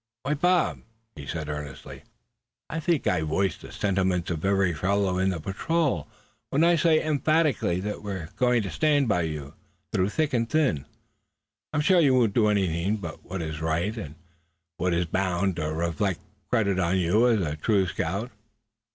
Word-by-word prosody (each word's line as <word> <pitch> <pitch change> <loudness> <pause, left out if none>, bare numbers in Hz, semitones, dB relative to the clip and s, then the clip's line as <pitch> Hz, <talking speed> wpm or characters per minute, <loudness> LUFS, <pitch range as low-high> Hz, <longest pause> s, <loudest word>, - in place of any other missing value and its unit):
"Why, 140 - 0
Bob," 175 +3 +2 0.3
he 70 -3 -9
said, 80 0 -4
earnestly, 75 -2 -7 0.7
"I 165 - -2
think 160 -1 0
I 90 -3 +2
voice 80 +4 0
the - - -12
sentiments 95 -3 0
of 80 -2 -3
every 95 -2 +2
fellow 95 +2 0
in 95 +1 +2
the 90 -3 -2
patrol 150 - -1 0.4
when 145 +4 +2
I 170 +1 +5
say 165 0 +3
most - - -1
emphatically 155 - +1
that 105 +1 -4
we're 95 -6 -5
going 125 -3 +2
to 95 - -4
stand 145 -3 +2
by 100 -5 +2
you 75 -3 -4 0.4
through 95 +2 +2
thick 150 +5 -1
and 115 -1 +1
thin. 140 - +1 0.8
I'm 150 - +1
sure 180 +4 +4
you 140 -6 +4
won't 115 -5 +3
do 110 -1 +3
anything 95 -1 +1
but 85 -6 -8
what 90 -1 -5
is 80 -1 -5
right, 85 +7 0
and 80 -10 -7 0.6
what 90 0 0
is 85 +1 +1
bound 95 +1 0
to 75 -2 -2
reflect 85 +3 -1 0.3
credit 100 -5 +1
on 90 +1 +2
you 95 +7 +3
as 115 -3 +3
a 75 -4 -2
true 95 +4 +2
scout. 95 +6 -3
95 Hz, 175 wpm, -26 LUFS, 85-125 Hz, 0.8 s, I